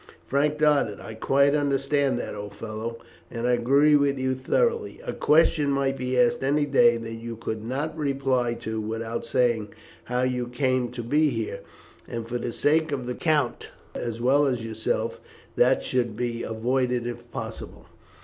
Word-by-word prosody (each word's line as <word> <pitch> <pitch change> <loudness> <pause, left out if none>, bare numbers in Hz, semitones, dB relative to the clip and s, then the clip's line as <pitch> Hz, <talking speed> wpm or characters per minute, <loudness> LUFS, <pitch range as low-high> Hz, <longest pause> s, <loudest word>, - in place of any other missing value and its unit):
Frank 150 +2 +1
nodded. 145 -9 +2
"I 110 - -8
quite 140 +5 +3
understand 140 -2 +1
that, - - -4
old 105 -1 -7
fellow, 115 +2 -5 0.3
and 115 0 -4
I 125 - +3
agree 140 +5 +4
with 140 -1 +2
you 130 0 0
thoroughly. 460 - 0
A - - -3
question 155 -1 +3
might 135 -1 +1
be 125 -1 -1
asked 125 +1 +3
any 145 +2 +2
day 120 -4 +4
that 115 0 -6
you 115 0 -6
could 110 -1 -5
not 140 +7 -3
reply 135 -5 0
to 110 -1 -3
without 115 +2 -4
saying 115 -4 +1 0.3
how 125 +1 -1
you 125 -1 -1
came 130 0 0
to 120 -1 -5
be 150 +6 +3
here; 110 -5 -3 0.5
and 115 -1 -5
for 120 +1 -3
the 120 - -3
sake 155 +5 +2
of 130 -3 -2
the 125 - -3
count 150 -4 0 0.3
as 115 -1 -4
well 140 +4 +3
as 125 -4 -1
yourself, 110 0 -2 0.4
that 125 +2 +3
should 120 -4 -1
be 120 -1 -2
avoided 125 +2 0
if 120 0 -6
possible." - - -7
125 Hz, 170 wpm, -25 LUFS, 115-140 Hz, 0.5 s, agree